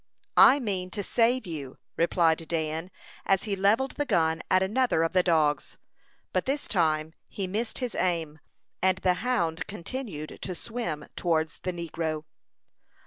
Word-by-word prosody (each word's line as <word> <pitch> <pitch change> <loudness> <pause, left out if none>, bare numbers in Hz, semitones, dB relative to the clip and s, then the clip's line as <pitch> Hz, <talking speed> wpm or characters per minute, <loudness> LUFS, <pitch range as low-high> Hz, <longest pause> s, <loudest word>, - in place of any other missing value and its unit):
"I 280 - +8
mean 190 -7 -2
to 205 - -1
save 235 +3 +2
you," 145 -7 -6 0.2
replied 165 -1 +2
Dan, 160 +1 -2 0.3
as 195 -1 +2
he 205 -3 -1
levelled 210 +8 +2
the 290 - 0
gun 160 -1 +2
at 185 0 +4
another 215 -3 +2
of 165 - 0
the 185 - +5
dogs; 155 -5 +1 0.6
but 185 - +1
this 285 +2 -1
time 160 -4 +1 0.2
he 195 - -3
missed 220 +5 -3
his 250 -3 -2
aim, 165 -4 -1 0.4
and 185 0 +3
the 185 -1 +2
hound 175 -9 0
continued 195 - -6
to 185 - -4
swim 225 -7 -4
towards 160 -2 0
the 185 - -2
negro. 165 -2 -3
180 Hz, 150 wpm, -28 LUFS, 160-210 Hz, 0.6 s, I